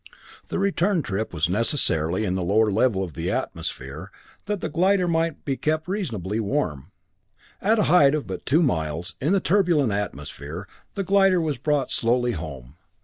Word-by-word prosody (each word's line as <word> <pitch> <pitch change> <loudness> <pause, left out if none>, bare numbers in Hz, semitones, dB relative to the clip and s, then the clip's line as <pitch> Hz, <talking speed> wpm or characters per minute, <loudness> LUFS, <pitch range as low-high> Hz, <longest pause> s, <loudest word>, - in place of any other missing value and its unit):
The - - -3
return 195 -2 +1
trip 105 +2 -3
was 80 -1 0
necessarily 95 - +1
in 90 - -1
the 95 - -1
lower 105 +4 +2
level 105 -2 +2
of 85 -4 -6
the 85 +2 -3
atmosphere, - - -4 0.4
that 205 -1 -1
the - - -3
glider 185 +3 +2
might 165 -2 -1
be 135 - 0
kept 155 +1 -1
reasonably 115 - -3
warm. 100 - -2 0.7
At 220 +3 +3
a 210 - +3
height 150 -4 +5
of 150 - -3
but 95 -1 -6
two 160 +6 +3
miles, 85 - -1
in 150 +6 +1
the 200 - +4
turbulent 175 - +2
atmosphere, 80 -2 -5 0.3
the 200 - -1
glider 195 -1 +4
was 155 -6 -2
brought 145 -1 0
slowly 120 +1 +2
home. 70 - -7
125 Hz, 170 wpm, -24 LUFS, -, 0.7 s, height